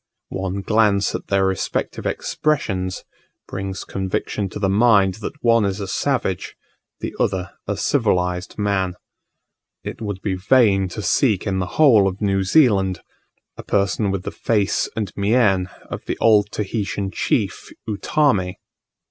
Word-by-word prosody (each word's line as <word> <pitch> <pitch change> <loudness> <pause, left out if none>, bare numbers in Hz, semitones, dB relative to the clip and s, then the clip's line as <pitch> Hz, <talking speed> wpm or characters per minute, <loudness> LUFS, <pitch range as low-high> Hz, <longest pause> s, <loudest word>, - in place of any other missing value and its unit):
One 95 +1 -3
glance 105 -1 +2
at - - -5
their 95 -1 +2
respective 95 -1 -2
expressions, 95 -12 -1 0.4
brings 95 0 -5
conviction 95 +1 -3
to - - -7
the 100 -2 0
mind 100 -2 +4
that 145 +7 -7
one 115 -2 +4
is 100 0 -1
a 100 - -4
savage, 115 -4 -1 0.5
the - - -4
other 95 0 0 0.2
a 100 -1 -2
civilized 90 -8 0
man. 95 -3 0 0.9
It - - -7
would 100 -3 -5
be 100 - 0
vain 95 0 +3
to 100 +4 -6
seek 105 -2 +2
in 95 -2 -1
the 90 - -2
whole 115 -11 +6
of 95 +1 -3
New 100 -2 +1
Zealand 95 - +3 0.6
a - - -6
person 100 +1 0
with 95 -1 -2
the - - -4
face 105 -4 0
and 105 -5 -3
mien 100 -3 +2 0.2
of - - -7
the - - -3
old 105 -2 +4
Tahitian 100 -2 -3
chief - - -1 0.2
Utamme. 105 -3 +1
100 Hz, 145 wpm, -21 LUFS, 95-110 Hz, 0.9 s, whole